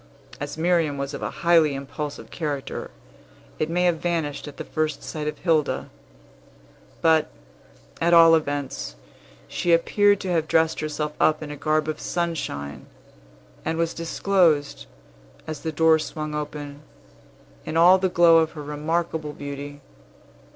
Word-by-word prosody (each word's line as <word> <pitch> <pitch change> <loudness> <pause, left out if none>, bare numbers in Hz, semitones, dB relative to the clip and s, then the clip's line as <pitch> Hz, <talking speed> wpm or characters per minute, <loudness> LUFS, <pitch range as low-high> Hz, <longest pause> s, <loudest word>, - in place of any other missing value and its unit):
As 145 +1 -5
Miriam 165 -3 +1
was 140 +1 -4
of - - -6
a - - -2 0.2
highly 165 -4 +5
impulsive 145 +2 -6
character, 145 -5 -4 0.7
it 155 - 0
may 175 +2 +1
have 175 -2 +2
vanished 160 -5 -2
at 145 - -10
the - - -5
first 155 -1 -2
sight 150 -1 -5
of 150 - -3
Hilda; 160 -4 0 1.1
but, 160 -1 +4 0.7
at 170 +1 +3
all 165 -1 +8
events, 145 - -1 0.5
she 175 - -1
appeared 205 +4 +3
to 185 - -3
have 160 -2 +1
dressed 160 0 +2
herself 150 0 -3
up 155 0 +3
in 150 - -7
a - - -5
garb 155 +1 0
of 155 - -3
sunshine, 160 - -3 0.8
and 160 - -2
was 165 0 0
disclosed, 165 - +1 0.6
as 155 -1 -5
the 160 - -3
door 160 +1 +4
swung 155 0 -5
open, 145 -1 -6 0.8
in 160 - -3
all 180 +3 +7
the 190 0 +1
glow 170 -2 +6
of 160 0 0
her 150 -2 -7
remarkable 155 +1 -2
beauty. 145 0 -7
155 Hz, 145 wpm, -24 LUFS, 145-165 Hz, 1.1 s, all